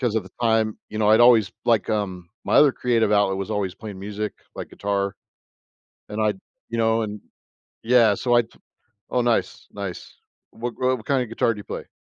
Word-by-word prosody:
'Cause 120 -4 0
at 110 - +1
the 95 - -14
time, 110 -2 +1
you 110 - -5
know, 105 -1 +2
I'd 110 +2 +6
always 115 -4 +6
like 115 -3 +2
um, 95 -5 -3 0.2
my - - 0
other 145 -3 +6
creative 115 -3 +1
outlet 100 -2 +3
was 100 +2 -4
always 100 -3 -2
playing 105 -4 -9
music, 105 +1 -4 0.2
like - - -7
guitar, 100 -1 -2 1.0
and 105 +1 -3
I 105 -1 +2 0.4
you 115 - -3
know, 115 0 +2
and 105 -1 -5 0.6
yeah, 115 -3 +5
so, 120 +4 0
I 120 - +6
t 110 - -18 0.6
oh, 125 - +1
nice, 120 -1 -1
nice. 100 -3 -7 0.4
What 120 +1 -5
gro 130 - 0
what - - -11
what 110 - -14
kinda 130 -3 +1
guitar 115 +1 0
do - - -11
you 100 - -9
play? - - -6
110 Hz, 205 wpm, -23 LUFS, 100-115 Hz, 1.0 s, I'd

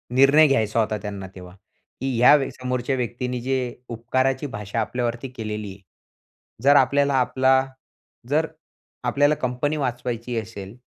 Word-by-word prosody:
निर्णय 140 +4 +6
घ्यायचा 110 -5 +1
होता 110 -1 0
त्यांना 100 -2 -6
तेव्हा, 90 -1 -11
की 130 +5 -7
या 125 +5 +7 0.2
समोरच्या 125 +1 -2
व्यक्तींनी 125 0 -3
जे 130 +1 0 0.3
उपकाराची 130 +4 -1
भाषा 105 -2 -4
आपल्यावरती 120 +2 -3
केलेली 105 -4 -5
आहे. 100 +1 -14 0.8
जर 145 +1 +6
आपल्याला 140 +1 +3
आपला 130 +1 +3 0.7
जर, 155 +3 +2 0.6
आपल्याला 145 +4 +2
कंपनी 130 +5 -1
वाचवायची 120 -2 -3
असेल 105 -2 -9
125 Hz, 125 wpm, -23 LUFS, 110-135 Hz, 0.8 s, या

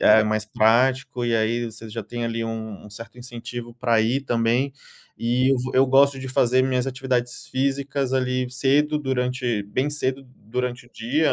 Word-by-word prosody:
é 110 +1 +7
mais 110 0 0
prático, 125 +3 +2
e 115 -1 +2
aí 115 +2 +1
você 110 0 -9
já 115 +1 -5
tem 120 +3 -5
ali 115 0 -2
um 110 -2 -6
um 105 - -13
certo 115 +4 -10
incentivo 120 -1 -7
pra 120 -2 +2
ir 120 +5 +1
também, 120 +2 +1 0.5
e 125 +3 +2
eu 135 - +3
vou 125 +1 -4
eu 130 +1 +5
gosto 135 +1 +4
de 130 0 -6
fazer 130 0 +3
minhas 130 -1 +1
atividades 125 -2 -2
físicas 135 0 -1
ali 130 -1 0
cedo 145 +4 +2
durante 125 -5 -1
bem 130 +8 -1
cedo 135 -2 -1
durante 125 +2 -4
o 125 - -23
dia, 140 +8 +1
125 Hz, 180 wpm, -23 LUFS, 115-130 Hz, 0.5 s, é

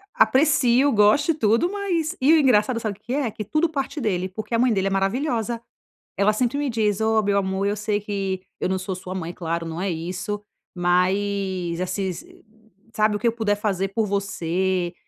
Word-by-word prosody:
Aprecio, 270 -1 +4
gosto 225 +8 +4
e - - +1
tudo, 235 - +2
mas 370 -5 -1
e 285 +5 +5
o - - +7
engraçado 245 -3 +3
sabe 215 -4 -4
o - - -37
que 240 - -5
é? 270 -5 0
Que 215 - -6
tudo 310 - +1
parte 290 0 -3
dele, 185 -5 0
porque 215 +5 -7
a 230 - +2
mãe 245 -1 +3
dele 195 -1 0
é - - +1
maravilhosa. 230 +4 -1 0.5
Ela 200 +1 +3
sempre 245 +4 0
me 290 -1 -1
diz: 215 -3 0
"Ó, 220 0 +3
meu 200 -1 +1
amor 190 0 0
eu 205 - 0
sei 210 0 -1
que 195 -2 -3 0.2
eu - - -1
não 190 - 0
sou 185 0 -4
sua 185 0 -7
mãe, 175 -2 -4
claro 170 -1 -3
não 165 +1 -5
é 195 - -1
isso, 185 +5 -4 0.3
mas 185 0 0
assim, 185 0 -3
s 360 +1 -19 0.5
sabe 215 -1 +2
o 205 - -2
que 235 - +1
eu - - +4
puder 220 -3 0
fazer 195 -2 -1
por 220 +3 0
você", 190 -2 -1
205 Hz, 205 wpm, -23 LUFS, 190-240 Hz, 0.5 s, o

